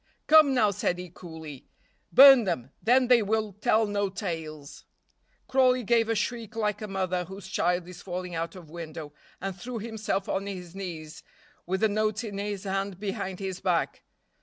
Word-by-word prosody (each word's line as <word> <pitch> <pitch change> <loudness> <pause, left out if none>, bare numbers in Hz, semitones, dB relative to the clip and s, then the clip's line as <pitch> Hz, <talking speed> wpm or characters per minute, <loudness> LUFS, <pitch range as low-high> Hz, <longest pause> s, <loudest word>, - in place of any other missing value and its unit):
"Come, 305 -3 +6
now," 215 -5 +4
said 180 -2 -1
he 180 -1 -8
coolly, 160 -6 -10 0.4
"burn 270 -3 +9
them; 140 -8 -2
then 250 +2 +4
they 245 -2 +6
will 215 0 -1
tell 215 +2 +2
no 205 -1 -1
tales." 160 -7 -6 0.6
Crawley 255 -1 +3
gave 230 +1 +2
a 225 - +2
shriek 230 +1 -3
like 210 -2 -1
a 215 - -4
mother 185 -2 -1
whose 190 +1 -9
child 175 -1 0
is 180 -1 -10
falling 180 -1 -5
out 165 +2 -3
of 170 -5 -12
window, 160 -3 -7 0.3
and 195 0 -4
threw 235 +6 -6
himself 220 -3 -3
on 195 +1 -2
his 180 -3 -7
knees, 170 -5 -7 0.5
with 190 +1 -1
the 220 - +5
notes 215 +1 0
in 205 -3 -5
his 205 -1 -3
hand 195 -1 -3
behind 190 -2 -4
his 190 -2 -4
back. - - 0
195 Hz, 175 wpm, -27 LUFS, 180-220 Hz, 0.6 s, burn